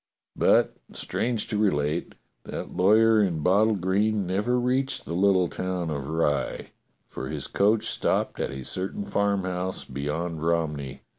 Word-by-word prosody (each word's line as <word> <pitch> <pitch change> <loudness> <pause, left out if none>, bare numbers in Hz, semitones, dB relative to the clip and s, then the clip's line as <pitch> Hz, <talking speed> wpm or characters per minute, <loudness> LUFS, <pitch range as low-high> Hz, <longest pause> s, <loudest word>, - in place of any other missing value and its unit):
But, - - +3 0.2
strange 115 -3 -2
to 105 -3 -1
relate, 75 -5 0 0.3
that - - -6
lawyer 110 +4 +5
in 85 -6 0
bottle 105 +4 +4
green 100 +2 +1
never 105 +7 0
reached 130 +2 0
the - - -5
little 95 0 +3
town 90 -2 -3
of 70 -2 -4
Rye, 80 -3 -1 0.4
for 65 - -6
his - - -4
coach 105 +2 +2
stopped - - -1
at - - -1
a 65 -1 -7
certain 95 - -4
farmhouse 95 - -1
beyond 75 +5 -3
Rom 85 -2 +1
ney. 70 -2 -7
95 Hz, 145 wpm, -26 LUFS, 80-105 Hz, 0.4 s, lawyer